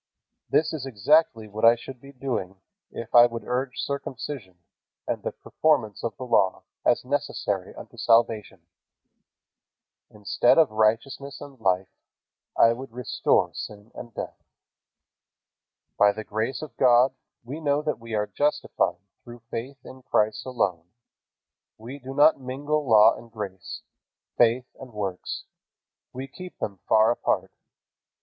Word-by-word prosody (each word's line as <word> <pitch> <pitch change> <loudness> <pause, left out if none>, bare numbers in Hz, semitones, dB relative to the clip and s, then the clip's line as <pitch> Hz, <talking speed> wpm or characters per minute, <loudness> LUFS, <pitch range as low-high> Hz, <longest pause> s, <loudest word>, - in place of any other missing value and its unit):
This 155 +1 +2
is 140 -4 -4
exactly 115 0 +2
what 105 +1 -7
I 115 +1 +8
should 120 +1 -10
be 140 - -12
doing, 120 -8 -4 0.3
if 115 - -8
I 120 0 +9
would 115 -1 -6
urge 125 +1 -2
circumcision 135 -7 -5 0.5
and - - -2
the - - -3
performance 135 -11 0
of 115 - -3
the - - -6
Law 115 -6 +2 0.2
as 120 - +2
necessary 125 -8 -2
unto - - -12
salvation. 115 -5 +2 1.5
Instead 105 +3 +2
of 160 -6 +5
righteousness 115 +6 0
and 140 -3 -11
life, 95 -1 +1 0.7
I 115 - +6
would 130 +1 -8
restore 125 0 +1
sin 105 +2 -8
and 120 - -9
death." - - -7 1.6
By 105 0 +6
the 110 - -6
grace 110 +7 -3
of 155 - -9
God 125 0 +5 0.3
we 135 +7 -6
know 145 -1 +1
that 150 -7 -2
we 115 -1 -5
are 105 0 +1
justified 150 +5 0 0.3
through 120 -1 -12
faith 130 +4 -5
in 130 - -11
Christ 110 -1 0
alone. 90 -10 -1 0.9
We 125 +6 -9
do 135 +1 -8
not 150 0 +5
mingle 145 +2 -2
law 110 0 +7
and 115 -1 -13
grace, 100 -4 -7 0.5
faith 120 +1 +3
and 130 -3 -11
works. 95 -3 -4 0.7
We 130 +2 -6
keep 180 +4 -11
them 100 -3 -4
far 110 +1 +5
apart. 120 - -1
120 Hz, 140 wpm, -26 LUFS, 110-135 Hz, 1.6 s, I